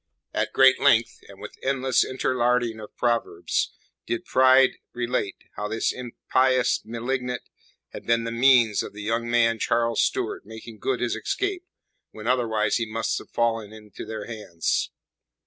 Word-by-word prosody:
At - - -1
great 130 -1 +5
length, 115 0 +3
and - - -14
with - - -10
endless 130 -2 +2
interlarding 125 -3 0
of 105 - -11
proverbs 115 -8 0 0.4
did 120 - -2
Pride 130 0 +5
relate 120 -5 -2 0.2
how 105 - -2
this 110 +2 -1
impious 125 +1 +1
malignant 125 +2 -3 0.5
had - - -10
been 115 0 +2
the 115 - -3
means 120 -3 +4
of - - -7
the 105 0 -8
young 115 +2 -1
man, 115 -1 +3
Charles 115 0 +1
Stuart, - - -1
making 110 +1 -11
good 130 +3 -1
his 125 - 0
escape 390 -2 -3 0.4
when 110 0 -11
otherwise 110 -4 +1
he 115 -2 -3
must 115 +1 -1
have - - -14
fallen 115 -3 -1
into 105 -1 -11
their 110 -1 -6
hands. 105 -8 -2
120 Hz, 150 wpm, -25 LUFS, 110-125 Hz, 0.5 s, great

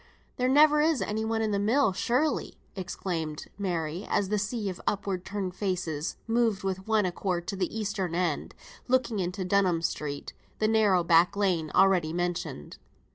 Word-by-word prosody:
"There 250 0 +1
never 300 +2 +6
is 310 -3 +2
anyone 220 +1 -1
in 215 - 0
the 200 - +1
mill, 225 +1 +3
surely!" 255 +10 0 0.2
exclaimed 170 -5 -4
Mary, 175 -2 -2
as 195 - +1
the 210 0 +1
sea 210 +1 -2
of 185 -2 -5
upward 195 -3 -1
turned 190 -1 -4
faces 180 -6 -2
moved 225 -3 +1
with 190 0 -3
one 220 -2 +3
accord 180 -1 -2
to - - -2
the 190 +3 -2
eastern 195 -5 -2
end, 175 -4 -1 0.3
looking 250 -4 +1
into 185 +1 -2
Dunham 180 -3 +2
Street, 145 -3 -3 0.2
the 215 - +1
narrow 210 -5 +3
back 170 +2 +4
lane 180 -6 +1
already 180 -5 +4
mentioned. 175 - -3
195 Hz, 160 wpm, -28 LUFS, 175-215 Hz, 0.3 s, never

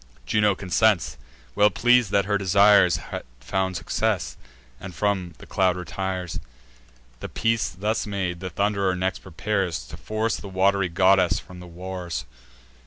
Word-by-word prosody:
Juno 105 -2 +2
consents, 95 +1 +1 0.4
well 105 +10 +5
pleas'd 120 +1 +3
that 100 0 +2
her 100 0 0
desires 100 -1 +5
Had - - -6 0.2
found 95 +8 -2
success, - - -1 0.4
and 95 -2 -9
from 90 -1 -1
the - - -13
cloud 95 -2 +1
retires. 90 +1 -4 0.8
The - - -6
peace 115 -1 0
thus 105 +4 -2
made, 95 -4 -3
the 95 0 -5
Thund'rer 100 -1 0
next 95 +1 -1
prepares 95 -5 -2
To - - -8
force 110 +1 -2
the 100 - -9
wat'ry 95 0 +2
goddess 95 +1 +4
from 90 -1 -10
the 90 - -10
wars. 90 0 -6
95 Hz, 145 wpm, -24 LUFS, 90-105 Hz, 0.8 s, well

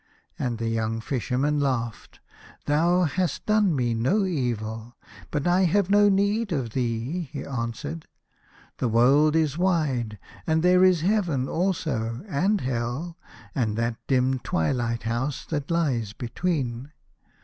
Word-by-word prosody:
" - - -39
And 120 -2 -1
the 115 0 -2
young 115 0 -1
Fisherman 135 +4 -1
laughed. 120 -5 -3 0.2
" - - -22
Thou 170 +5 +3
hast 175 +2 -1
done 210 -5 +3
me 120 -3 0
no 155 - +1
evil, 120 - -3 0.3
but 145 -2 -2
I 180 +2 +4
have 195 +2 +2
no 205 0 +6
need 200 +2 +1
of 130 -8 -2
thee," 125 +7 -2
he 145 - -5
answered. 135 +6 -5 0.4
" - - -29
The 125 - +1
world 135 +7 +4
is 155 -1 +1
wide, 140 - 0 0.3
and 160 0 +2
there 180 +1 +5
is 185 -3 +5
Heaven 175 -9 +1
also, 155 -10 -1
and 195 +5 +1
Hell, 125 +7 -3 0.4
and 110 -6 -1
that 115 0 -1
dim 130 0 +2
twilight 115 +5 -1
house 120 +5 -2
that 145 -3 -3
lies 130 - 0
between. 135 -1 -3
140 Hz, 145 wpm, -25 LUFS, 120-175 Hz, 0.4 s, no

